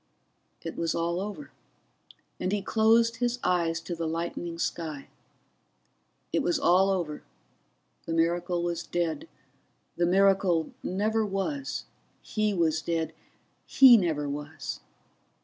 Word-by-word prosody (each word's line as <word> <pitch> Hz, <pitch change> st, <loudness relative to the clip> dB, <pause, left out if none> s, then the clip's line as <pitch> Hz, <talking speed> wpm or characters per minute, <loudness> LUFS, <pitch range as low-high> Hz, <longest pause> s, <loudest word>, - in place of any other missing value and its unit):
It 165 Hz, -, -5 dB
was 165 Hz, -1 st, -1 dB
all 170 Hz, +1 st, -1 dB
over, 210 Hz, +9 st, -7 dB, 0.9 s
and 185 Hz, -, -1 dB
he 205 Hz, -1 st, -1 dB
closed 230 Hz, +2 st, +3 dB
his 245 Hz, 0 st, 0 dB
eyes 170 Hz, -2 st, +1 dB
to 170 Hz, +1 st, -5 dB
the 165 Hz, -1 st, -3 dB
lightening 170 Hz, +1 st, -4 dB
sky. 155 Hz, -4 st, -4 dB, 1.2 s
It -, -, +2 dB
was 345 Hz, -, +1 dB
all 190 Hz, -7 st, +4 dB
over, 175 Hz, -6 st, -2 dB, 0.9 s
the 165 Hz, -, -2 dB
miracle 170 Hz, +1 st, +1 dB
was 175 Hz, -1 st, -2 dB
dead, 175 Hz, -, -3 dB, 0.7 s
the 175 Hz, -, +2 dB
miracle 190 Hz, -3 st, +3 dB
never 215 Hz, +4 st, 0 dB
was, 215 Hz, +8 st, -3 dB, 0.3 s
he 215 Hz, -1 st, -1 dB
was 165 Hz, -4 st, +1 dB
dead, 160 Hz, 0 st, -2 dB, 0.5 s
he 260 Hz, -3 st, +8 dB
never 160 Hz, -8 st, +1 dB
was. 145 Hz, +1 st, -5 dB
175 Hz, 120 wpm, -28 LUFS, 165-210 Hz, 1.2 s, he